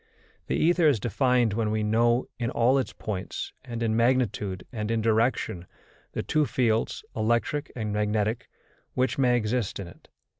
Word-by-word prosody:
The - - 0
ether 170 0 +4
is 140 -7 +3
defined 125 0 +2
when 110 0 0
we 110 0 0
know, 120 +3 +2
in 120 -1 -1
all 125 +3 +3
its 130 - -2
points, 100 -4 -5
and 115 -2 -4
in 110 -1 +1
magnitude 115 -6 +1
and 105 -2 -3
in 115 0 +1
direction, 110 -5 +1 0.5
the - - -2
two 155 -2 +1
fields, 115 -2 0
electric 120 +7 0
and 110 -3 -3
magnetic, 105 +1 0 0.5
which 130 +2 0
may 125 -2 +4
exist 110 -2 -1
in 95 - -5
it. 85 - -16
115 Hz, 160 wpm, -27 LUFS, 105-125 Hz, 0.5 s, ether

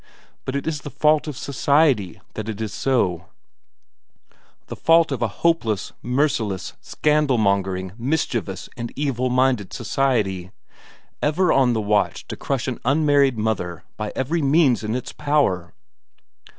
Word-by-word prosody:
But 130 - -3
it 140 - -2
is 155 -3 -2
the 145 - -7
fault 150 +1 +2
of 145 -4 -5
society 140 - +1
that 110 0 -5
it 110 -1 -5
is 110 -2 -4
so; 95 -10 0 1.4
the - - -7
fault 165 -1 +4
of 135 - -3
a 120 - +2 0.2
hopeless, 115 - +1
merciless, 125 -7 -1
scandalmongering, 100 -11 +1
mischievous, 120 -7 -2
and 120 -2 -5
evil 130 -3 -1
minded 125 -5 +1
society, 105 -10 0 0.7
ever 160 +4 +2
on 130 -3 +4
the 110 - 0
watch 105 0 0
to - - -4
crush 135 -5 -2
an 130 - -3
unmarried 140 -2 +3
mother 90 -6 -2
by 105 -1 -4
every 155 +6 -1
means 140 -4 +3
in 110 +2 -2
its 125 - -5
power! 145 - 0
125 Hz, 135 wpm, -22 LUFS, 105-145 Hz, 1.4 s, fault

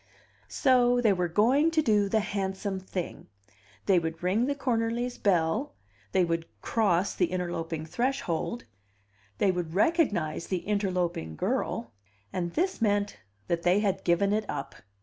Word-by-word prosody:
So 245 -3 +3
they 220 -4 +4
were 180 -1 0
going 245 - +3
to 320 -1 +1
do 205 -4 +3
the 220 +1 +2
handsome 195 -1 -3
thing; 185 -2 -6 0.6
they 190 -3 +4
would 165 0 -5
ring 205 +7 +2
the 285 - 0
Cornerlys' 240 -2 -1
bell; 185 - +1 0.4
they 185 - +3
would 165 -1 -2
cross 200 -4 +1
the 180 - +1
interloping 165 -3 -3
threshold, 210 -3 -2 0.7
they 195 - +3
would 175 -2 -4
recognize 205 - +1
the 180 -2 -2
interloping 180 - -1
girl; 115 +8 -2 0.4
and 175 -2 -2
this 370 -4 0
meant 205 -2 +1 0.3
that 170 0 0
they 180 +4 +3
had 195 -2 0
given 190 +4 +2
it 215 -1 -1
up. 140 -1 -4
195 Hz, 145 wpm, -28 LUFS, 175-225 Hz, 0.7 s, they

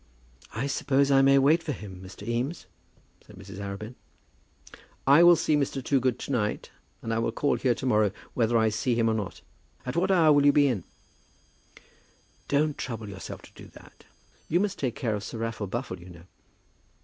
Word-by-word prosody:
"I 120 +5 -1
suppose 140 0 +1
I 135 0 +6
may 135 0 +5
wait 150 +5 +4
for 155 -3 -3
him, 95 -6 -9
Mr. 95 +3 -11
Eames?" 125 +8 -2 0.6
said - - -16
Mrs. 95 0 -10
Arabin. 100 +3 -6 1.1
"I 140 +4 +7
will 175 0 +8
see 155 - +1
Mr. 140 -2 -1
Toogood 130 -3 +1
to - - -6
night, 105 -5 -2 0.3
and 115 - -2
I 115 - 0
will 115 - 0
call 145 +5 0
here 125 -3 +1
to - - -6
morrow, 110 -4 +3 0.2
whether 115 -1 +2
I 110 -1 +3
see 110 +3 -1
him 115 -1 +2
or 110 - +2
not. 105 -3 -4 0.4
At 125 - -4
what 180 +3 +1
hour 165 -5 +5
will 145 -1 +4
you 145 - +6
be 145 - +5
in?" 115 -10 -2 1.6
"Don't 150 +1 +1
trouble 115 -4 -5
yourself 95 -1 -8
to - - -16
do - - -13
that. - - -17 0.4
You 175 - +2
must 200 0 -1
take 130 -4 -2
care 115 -4 -2
of 105 -1 -4
Sir 115 - -6
Raffle 115 -2 -3
Buffle, 90 - -4
you 90 +1 -13
know." 85 -1 -13
125 Hz, 195 wpm, -27 LUFS, 105-140 Hz, 1.6 s, will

